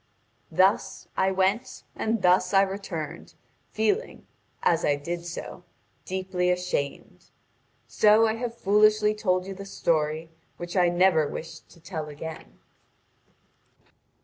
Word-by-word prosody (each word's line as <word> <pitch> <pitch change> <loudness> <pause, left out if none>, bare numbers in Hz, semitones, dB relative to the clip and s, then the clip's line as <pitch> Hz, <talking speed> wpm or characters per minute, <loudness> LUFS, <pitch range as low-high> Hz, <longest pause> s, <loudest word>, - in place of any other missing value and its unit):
Thus 190 +2 +1
I 190 - +2
went 195 +7 0
and 220 -2 -1
thus 180 +1 +3
I 195 - +7
returned, 190 -5 -6 0.3
feeling, 220 - -1 0.4
as 170 0 +2
I 145 - +3
did 170 +4 -5
so, 175 +1 -7 0.4
deeply 185 -1 -1
ashamed. 180 -6 -3 0.6
So 215 +1 +5
I 220 - +1
have 235 0 -5
foolishly 210 0 +4
told 185 -4 0
you 195 - -6
the 200 +1 -8
story 160 -4 -1 0.3
which 175 +1 -7
I 180 -2 +4
never 175 -3 +3
wished 160 - -8
to - - -18
tell 160 -2 -6
again." 155 +2 -9
185 Hz, 120 wpm, -26 LUFS, 170-205 Hz, 0.6 s, I